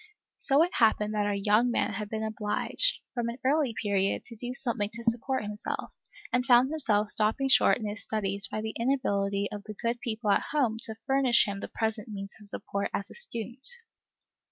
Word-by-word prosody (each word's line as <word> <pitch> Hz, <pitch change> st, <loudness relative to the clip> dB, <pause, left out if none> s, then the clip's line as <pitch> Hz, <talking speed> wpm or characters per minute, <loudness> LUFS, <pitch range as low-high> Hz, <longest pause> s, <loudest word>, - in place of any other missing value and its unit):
So 280 Hz, +3 st, +4 dB
it 355 Hz, -, -2 dB
happened 215 Hz, -2 st, +2 dB
that 210 Hz, -1 st, 0 dB
our 205 Hz, -, 0 dB
young 210 Hz, +4 st, +3 dB
man 235 Hz, -, 0 dB
had 210 Hz, -2 st, -5 dB
been 220 Hz, 0 st, -3 dB
obliged, 220 Hz, -, +1 dB, 0.2 s
from 240 Hz, -2 st, -2 dB
an 235 Hz, -, -6 dB
early 275 Hz, -4 st, +2 dB
period, 200 Hz, -2 st, 0 dB
to 235 Hz, -, -8 dB
do 245 Hz, +3 st, -5 dB
something 240 Hz, -6 st, -1 dB
to 235 Hz, 0 st, -6 dB
support 235 Hz, +2 st, 0 dB
himself, 210 Hz, 0 st, -5 dB, 0.4 s
and 250 Hz, 0 st, +3 dB
found 250 Hz, +1 st, +5 dB
himself 215 Hz, -9 st, +3 dB
stopped 215 Hz, +3 st, +1 dB
short -, -, +6 dB
in 225 Hz, -, -6 dB
his 210 Hz, +1 st, -4 dB
studies 200 Hz, -2 st, -1 dB
by 215 Hz, -, -4 dB
the 220 Hz, 0 st, -4 dB
inability 200 Hz, -6 st, 0 dB
of 205 Hz, -1 st, -6 dB
the 215 Hz, -, -8 dB
good 235 Hz, +3 st, -2 dB
people 220 Hz, -3 st, -1 dB
at -, -, +2 dB
home 250 Hz, -7 st, +1 dB
to 220 Hz, -, -6 dB
furnish 270 Hz, -3 st, +4 dB
him 200 Hz, -1 st, -4 dB
the -, -, -5 dB
present 220 Hz, -1 st, -2 dB
means 195 Hz, -2 st, -7 dB
of 210 Hz, -, -8 dB
support 200 Hz, 0 st, -3 dB
as 200 Hz, +1 st, -4 dB
a -, -, -10 dB
student. 240 Hz, -, -3 dB
220 Hz, 200 wpm, -28 LUFS, 205-245 Hz, 0.4 s, short